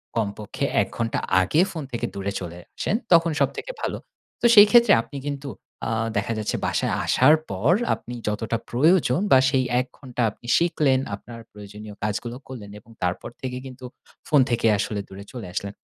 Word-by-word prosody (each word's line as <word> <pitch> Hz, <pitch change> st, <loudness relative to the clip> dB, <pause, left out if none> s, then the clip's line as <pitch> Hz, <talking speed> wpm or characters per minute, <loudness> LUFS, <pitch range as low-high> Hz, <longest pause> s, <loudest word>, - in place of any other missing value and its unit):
কমপক্ষে 105 Hz, -2 st, -2 dB, 0.2 s
১ -, -, -1 dB
ঘন্টা 115 Hz, -1 st, -1 dB, 0.2 s
আগে 95 Hz, -, +2 dB
ফোন 160 Hz, -3 st, -5 dB
থেকে 120 Hz, -, -2 dB
দূরে 100 Hz, 0 st, -3 dB
চলে 85 Hz, -2 st, -7 dB, 0.2 s
আসেন, -, -, 0 dB, 0.2 s
তখন 165 Hz, -1 st, +5 dB
সবথেকে 140 Hz, -, -1 dB
ভালো। -, -, -2 dB, 0.4 s
তো -, -, 0 dB
সেই 205 Hz, 0 st, +10 dB
ক্ষেত্রে 235 Hz, -3 st, +6 dB
আপনি 130 Hz, +5 st, -10 dB
কিন্তু 140 Hz, -1 st, -4 dB, 0.4 s
আ -, -, -1 dB, 0.3 s
দেখা 100 Hz, +3 st, -1 dB
যাচ্ছে 110 Hz, -, -2 dB
বাসায় -, -, 0 dB
আসার 145 Hz, +5 st, +5 dB
পর 100 Hz, -, +1 dB, 0.2 s
আপনি 120 Hz, -, -7 dB
যতটা 110 Hz, +2 st, -1 dB
প্রয়োজন 155 Hz, +2 st, +3 dB
বা 130 Hz, -, +8 dB
সেই 135 Hz, -1 st, +2 dB, 0.2 s
১ 130 Hz, -, 0 dB
ঘন্টা 125 Hz, -3 st, -5 dB
আপনি 120 Hz, -, -16 dB
শিখলেন, 150 Hz, -6 st, +2 dB, 0.2 s
আপনার 115 Hz, +3 st, -11 dB
প্রয়োজনীয় 105 Hz, 0 st, -10 dB
কাজগুলো 105 Hz, +3 st, -3 dB
করলেন, 110 Hz, -6 st, -9 dB
এবং 115 Hz, -, -20 dB
তারপর 90 Hz, 0 st, -2 dB
থেকে 125 Hz, -1 st, -4 dB
কিন্তু 130 Hz, -1 st, -10 dB, 0.4 s
ফোন 150 Hz, -, +4 dB
থেকে 120 Hz, -1 st, +1 dB
আসলে 105 Hz, +1 st, -2 dB
দূরে 95 Hz, +1 st, -9 dB
চলে 120 Hz, -8 st, -7 dB
আসলেন 100 Hz, +2 st, -4 dB
120 Hz, 175 wpm, -24 LUFS, 105-140 Hz, 0.4 s, সেই